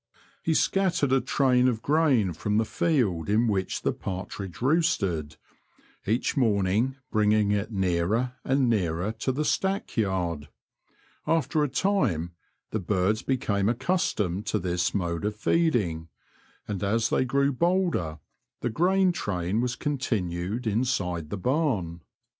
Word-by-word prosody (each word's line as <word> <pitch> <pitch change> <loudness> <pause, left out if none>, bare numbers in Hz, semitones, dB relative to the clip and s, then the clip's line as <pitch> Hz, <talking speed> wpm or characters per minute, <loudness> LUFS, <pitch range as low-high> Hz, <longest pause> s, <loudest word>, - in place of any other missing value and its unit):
He 160 - 0
scattered 180 -8 +2
a 135 0 +4
train 125 -1 +3
of 115 -3 -1
grain 140 - +2
from 105 +6 -1
the 110 - +2
field 110 - 0
in 110 +3 +3
which 95 -4 -1
the - - +1
partridge 95 0 -6
roosted, 100 - 0 0.7
each 115 +5 0
morning 110 0 +1 0.2
bringing 105 -1 +3
it 105 +2 -1
nearer 95 +6 0
and 135 -1 +2
nearer 95 -3 0
to 130 - 0
the 150 +4 -2
stack 195 +4 -1
yard. 90 -8 -1 0.8
After 160 -1 +1
a 145 - 0
time 125 - 0 0.4
the 110 - -1
birds 100 +3 0
became 105 -6 0
aceustomed 115 - -1
to - - +1
this 90 0 -1
mode 85 -3 -1
of 105 0 -1
feeding, 105 - +1 0.6
and 100 -3 -4
as 115 +3 +1
they - - +3
grew 140 +2 +1
bolder 170 - 0 0.4
the 120 - -1
grain 185 - +3
train 95 - -1
was 125 -1 -1
continued 110 - -2
inside 100 -8 -1
the 100 - -3
barn. 110 - -1
110 Hz, 135 wpm, -26 LUFS, 95-135 Hz, 0.8 s, a